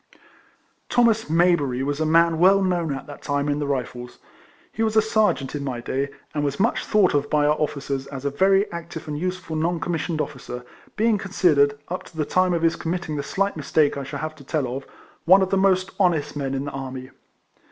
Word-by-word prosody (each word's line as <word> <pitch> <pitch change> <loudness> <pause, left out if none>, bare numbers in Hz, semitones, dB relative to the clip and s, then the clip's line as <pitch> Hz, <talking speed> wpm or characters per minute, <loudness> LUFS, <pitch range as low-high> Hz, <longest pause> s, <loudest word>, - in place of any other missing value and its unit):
Thomas 230 -2 +3
Mayberiy 155 -6 +2
was 145 +1 -2
a 155 - +1
man 165 0 +4
well 195 +2 +5
known 175 -4 0
at 135 - -5
that 145 - -11
time 145 0 -1
in 145 0 0
the 145 - -2
Rifles. 125 -3 -4 0.5
He - - -5
was 220 -1 +1
a - - +7
ser 215 -1 +3
geant 135 -1 -7
in 145 -1 -3
my 130 -3 -3
day, 135 +3 -2 0.2
and 145 - -1
was 140 +2 -2
much 230 +5 +1
thought 210 -4 +3
of 145 0 0
by 150 -1 +2
our 150 - +4
officers 140 -3 -3
as 140 -1 -7
a 140 - 0
very 195 +6 +3
active 170 -1 -7
and 150 - -3
useful 180 0 -4
non 165 +2 0
commissioned 165 -1 -2
officer, 125 -4 -5 0.3
being 220 -1 +2
considered, 150 -7 +2
up 180 - -3
to 165 - -15
the 155 - 0
time 185 +1 +2
of 165 - -2
his 165 0 +3
committing 170 -1 -3
the 145 - -2
slight 195 +7 -1
mistake 150 -1 +1
I 140 - -4
shall 140 +1 -6
have 155 0 -4
to 140 - -13
tell 140 -1 -1
of, 135 - -7 0.4
one 190 +3 +7
of 190 - -2
the - - +3
most 190 0 +2
honest 170 -7 +1
men 135 -2 -2
in 135 +1 -3
the 145 - -4
army. 130 -1 -7
155 Hz, 220 wpm, -23 LUFS, 140-185 Hz, 0.5 s, a